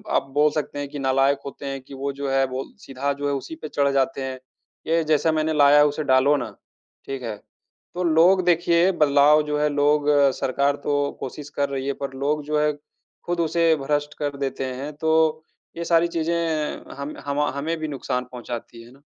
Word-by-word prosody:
आप - - +1
बोल 150 +1 +5
सकते 150 -1 -3
हैं 145 - -3
कि 145 0 -7
नालायक 135 +1 +2
होते 140 0 -8
हैं 135 -1 -4
कि, 130 - -14
वो 135 +1 -3
जो 140 0 -4
है, 135 0 +3
वो 130 +1 -4 0.2
सीधा 135 +2 -2
जो 145 +1 -4
है, 140 - 0
उसी 140 +3 -5
पे 155 - -8
चढ़ 140 -1 +1
जाते 135 +2 0
हैं, 130 -1 -4 0.5
"ये 165 0 +2
जैसा 155 +1 +2
मैंने 155 0 0
लाया 145 -1 +6
है, 145 - +7
उसे 150 +1 -1
डालो 135 +1 +4
ना।" 120 -5 -4 0.6
ठीक 135 -2 -5
है? 115 -3 -4 0.6
तो 180 - -1
लोग, 175 +3 +4
देखिए, 175 +1 +3
बदलाव 145 +1 +5
जो 150 0 -2
है, 150 0 +2
लोग 145 0 +2 0.3
सरकार 140 +2 +1
तो 145 -1 +1
कोशिश 145 +3 -7
कर 140 - +1
रही 135 -1 -3
है, 140 - 0
पर 135 - -4
लोग 150 +1 0
जो 150 0 0
है, 150 0 +2 0.5
खुद 175 0 -2
उसे 165 0 +3
भ्रष्ट 145 +1 -1
कर 145 -1 -2
देते 135 -1 -3
हैं। 130 +3 -5
तो 160 0 +2 0.6
ये 170 - -3
सारी 170 0 +3
चीज़ें 165 -2 -2
हम 140 +2 -6
हमा 145 +1 0
हमें 160 +4 -2
भी 155 - -3
नुकसान 130 -3 -3
पहुँचाती 120 -1 -7
हैं 120 - -16
ना। 135 +2 -20
145 Hz, 205 wpm, -23 LUFS, 135-155 Hz, 0.6 s, है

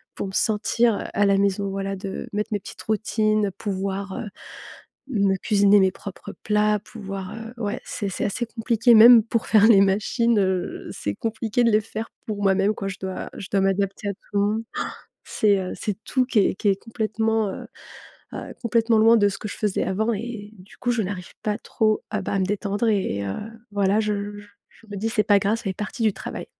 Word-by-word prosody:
pour - - -4
me 190 - -6
sentir, 225 +2 +2
heu, - - -4
à 205 - +3
la 195 0 +4
maison, 200 0 +1
voilà, 195 0 -3
de 195 0 -6
mettre 210 +2 -2
mes 205 - 0
petites - - -10
routines, 215 -1 +1
pouvoir, 195 0 -3
heu, - - -5 0.8
me 200 -5 +2
cuisiner 205 0 +4
mes 190 -1 +4
propres 195 +1 -9
plats, 210 0 +2
pouvoir, 195 -3 -7
heu, 225 +1 -8
ouais, 210 +4 -2
c'est 200 -3 -3
c'est - - -3
assez 235 +4 -1
compliqué. 230 +1 +2
Même 230 0 +9
pour 230 0 -2
faire 215 -1 +6
les 200 -4 +7
machines, 215 +4 +2
heu, 185 -2 -1
c'est 100 - -4
compliqué 225 +1 -1
de 230 - +4
les 215 0 +4
faire 220 +1 -6 0.2
pour 205 -2 -3
moi-même 195 +2 +3
quoi. 195 - -4
Je 190 - -6
dois 190 -1 -5
je 190 - -7
dois 195 - +2
m'adapter 195 +1 0
à - - -2
tout - - -25
le 200 - +2
monde. 215 +2 0
Han! - - 0 0.4
C'est, 205 -2 +2
heu, 185 - -4
c'est 210 -3 -3
tout 260 -1 +1
qui 240 -5 +3
est 195 - +2
qui 210 - -5
est 195 - +5
complètement, 220 -1 -1
heu - - -7 0.7
heu, - - -7
complètement 230 -1 +2
loin 225 +2 +6
de 205 -1 +4
ce 195 - -4
que - - -6
je - - -7
faisais 210 -3 0
avant 220 +5 0
et 215 -1 -6
du 185 +2 -16
coup, 245 - -1
je 235 -2 0
n'arrive 185 -2 -6
pas 210 0 -1
trop 215 -3 0
à, 210 -2 -2
bah, - - -4
à 195 - +1
me 190 - +2
détendre 205 +2 -1
et 190 - 0
heu, 95 -1 -3 0.4
voilà, 200 +1 +2
je 210 -1 0 0.2
je 205 - -12 0.2
je 225 - -22
me 205 - -5
dis 215 +3 -1
c'est 215 -2 +2
pas 205 0 +5
grave, 205 +3 +1
ça - - -11
fait 195 -2 -2
partie 210 +4 -5
du 215 -2 +3
travail, - - -7
205 Hz, 220 wpm, -23 LUFS, 195-220 Hz, 0.8 s, Même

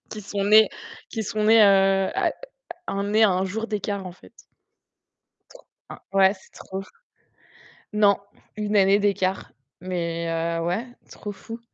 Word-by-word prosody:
qui 215 - -7
sont 200 0 -3
nés 215 +1 +6 0.4
qui 225 - -3
sont 215 +1 -2
nés, 225 +1 +6
heu, 195 -1 +4
à - - +1 0.6
à - - -2
un 200 0 -2
nés 215 +2 +2
à 215 - +6
1 185 +1 0
jour 220 +4 -4
d'écart 205 -2 -3
en 180 - -7
fait. 185 - -19 1.2
Tr - - -16 0.3
hein. - - -9
Ouais 195 0 +5
c'est 190 - -20
trop 190 - -8
ouf. 195 - -9 1.1
Non, 205 -2 +4 0.4
1 210 -1 -2
année 200 0 +5
d'écart 195 -2 -1 0.3
mais 170 -2 -3
heu, 165 0 -2
ouais, 215 +9 -2 0.2
trop 205 - -7
fou. 225 +3 -10
200 Hz, 165 wpm, -24 LUFS, 190-210 Hz, 1.2 s, nés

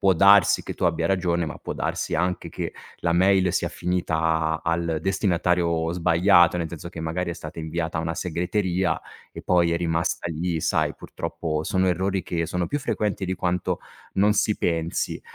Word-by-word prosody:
può 95 -1 +4
darsi 100 0 +6
che - - -5
tu - - -3
abbia 85 -1 +1
ragione, 85 -2 +1
ma 80 - -6
può - - -5
darsi - - -2
anche 90 +2 -1
che - - -5 0.3
la 85 -1 +1
mail 95 0 +3
sia - - 0
finita 80 -2 0
al 85 -1 0
destinatario 85 -3 +1
sbagliato, 90 0 +4
nel 85 -2 -2
senso 85 0 -7
che 85 -2 -8
magari 85 +2 -2
è 85 - -3
stata 80 +1 -9
inviata 80 +1 -3
a - - +1
una 80 +1 -2
segreteria, 90 0 -1 0.3
e - - -9
poi 85 -2 +3
è - - +2
rimasta 85 0 -1
lì. 85 +1 -2
Sai, - - +1
purtroppo 80 -2 -4
sono 95 +3 +1
errori 95 +2 0
che 85 -1 -2
sono 90 +1 -1
più 145 - -2
frequenti 105 -7 -2
di 95 - -1
quanto 90 -1 -1 0.3
non 105 +2 +4
si 105 0 +1
pensi. 85 -1 -1
85 Hz, 180 wpm, -24 LUFS, 80-90 Hz, 0.3 s, darsi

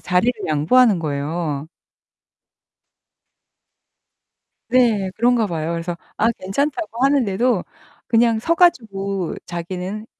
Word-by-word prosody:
자리를 180 +8 +1 0.2
양보하는 190 +8 +4
거예요. 150 0 -3 3.0
네, 230 -6 +2
그런가 235 -1 +2
봐요. 165 -2 -3
그래서 170 +1 -4 0.2
아, 225 +2 +2
괜찮다고 270 - -2
하는데도 245 -5 +2 0.4
그냥 230 -1 +3
서 335 +9 +1
가지고 200 - +1
자기는 185 +5 -5
200 Hz, 220 characters per minute, -20 LUFS, 175-240 Hz, 3.0 s, 양보하는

